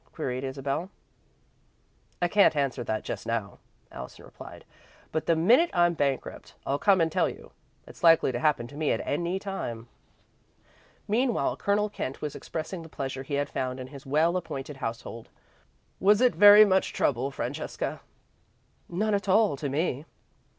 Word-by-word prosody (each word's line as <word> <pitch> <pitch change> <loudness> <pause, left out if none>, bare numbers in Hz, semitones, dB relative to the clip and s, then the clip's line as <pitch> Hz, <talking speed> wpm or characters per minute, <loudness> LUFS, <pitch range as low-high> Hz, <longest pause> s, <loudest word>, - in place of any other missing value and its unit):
queried 130 -4 -3
Isabel. 135 +6 -3 1.3
"I - - +4
can't 200 -2 +4
answer 140 -3 -1 0.2
just - - -6
now," 115 -3 -3 0.3
Allison 65 -1 -10
replied, - - -12 0.5
"but 160 - -2
the 165 - +4
minute 240 - +4
I'm 175 0 +4
bankrupt, 140 -4 -3
I'll 140 +1 -1
come 195 +1 +4
and 165 -1 +1
tell - - +2
you. - - -12 0.3
It's - - -15
likely 165 -5 +6
to 120 - -3
happen 145 -4 +1
to 145 - -13
me 150 0 0
at - - -2
any 175 +5 -1
time." 120 - -5 1.2
Meanwhile 235 +3 +1
Colonel 205 +1 +1
Kent 140 -10 -5
was 150 -2 -5
expressing 165 +3 -5
the 165 - -11
pleasure 135 -2 -5
he 140 +1 -4
had 145 +1 0
found 130 0 -3
in 130 - -6
his 140 - -10
well 155 +6 +2
appointed 140 -4 -6
household. 115 -1 -6 0.7
"Was 205 +2 +4
it 250 0 +4
very 205 +1 +9
much 190 -1 +1
trouble, 130 0 0
Francesca?" 140 - -4 0.9
"None 210 +5 0
at 200 0 -1
all 205 -3 +4
to 140 +1 -4
me." 145 0 -1
155 Hz, 155 wpm, -27 LUFS, 135-190 Hz, 1.3 s, very